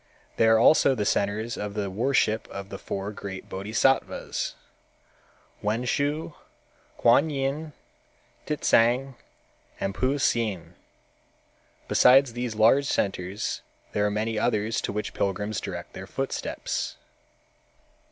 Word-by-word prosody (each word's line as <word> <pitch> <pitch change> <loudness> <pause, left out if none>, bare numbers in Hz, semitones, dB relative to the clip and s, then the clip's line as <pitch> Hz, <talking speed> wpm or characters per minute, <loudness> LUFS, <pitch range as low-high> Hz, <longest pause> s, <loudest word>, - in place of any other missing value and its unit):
They 115 - +4
are 110 0 +6
also 135 +3 +5
the 105 -4 -1
centers 105 +4 0
of 105 0 -5
the 100 -2 -2
worship 115 0 +1
of 100 0 -8
the 100 - -7
four 100 +1 -4
great 95 -2 -7
Bodhisattvas, 110 +7 0 1.1
Wenshu, 140 +9 -1 0.6
Kuan 135 +7 +4
Yin, 145 +2 -2 0.7
Titsang 130 -2 +2 0.7
and 100 - -2
Puhsien. 115 - 0 1.1
Besides 130 -1 +5
these 120 -2 -3
large 115 +6 +4
centers 95 +1 -2 0.3
there 105 - 0
are 105 - +2
many 110 +1 -1
others 110 -1 0
to - - -3
which 105 +1 -4
pilgrims 105 +1 -2
direct - - -6
their - - -8
footsteps. - - -3
110 Hz, 110 wpm, -26 LUFS, 100-135 Hz, 1.1 s, are